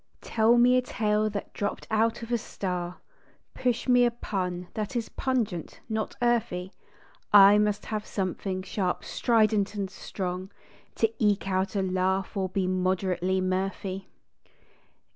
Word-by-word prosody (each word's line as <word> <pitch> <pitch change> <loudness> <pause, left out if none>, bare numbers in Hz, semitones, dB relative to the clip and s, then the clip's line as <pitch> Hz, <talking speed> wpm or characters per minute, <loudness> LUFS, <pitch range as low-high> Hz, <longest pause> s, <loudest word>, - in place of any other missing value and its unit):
Tell 225 +1 +3
me 250 +1 +6
a - - +3
tale 215 -3 0
that 205 -1 -6
dropped 205 - -3
out 225 +2 +1
of 230 - -7
a 240 - +3
star, 180 -4 -4 0.6
Push 250 -1 -1
me 245 -1 +5
a 240 - +5
pun 180 -6 -3
that 215 +2 -4
is 230 -2 -2
pungent, 225 - -2
not 220 -1 -3
earthy. 195 -6 0 0.6
I 205 0 +8
must 210 -1 0
have 215 -1 -4
something 185 -1 -3
sharp, 185 -2 -2
strident, 215 -3 +2
and 195 -2 -3
strong 185 0 -5 0.5
To 225 0 +1
eke 205 -2 +2
out 190 +1 0
a 195 - +1
laugh 190 +1 0
or 190 -2 -1
be 190 0 -1
moderately 185 0 0
mirthy. 190 +1 -2
200 Hz, 145 wpm, -27 LUFS, 185-220 Hz, 0.6 s, I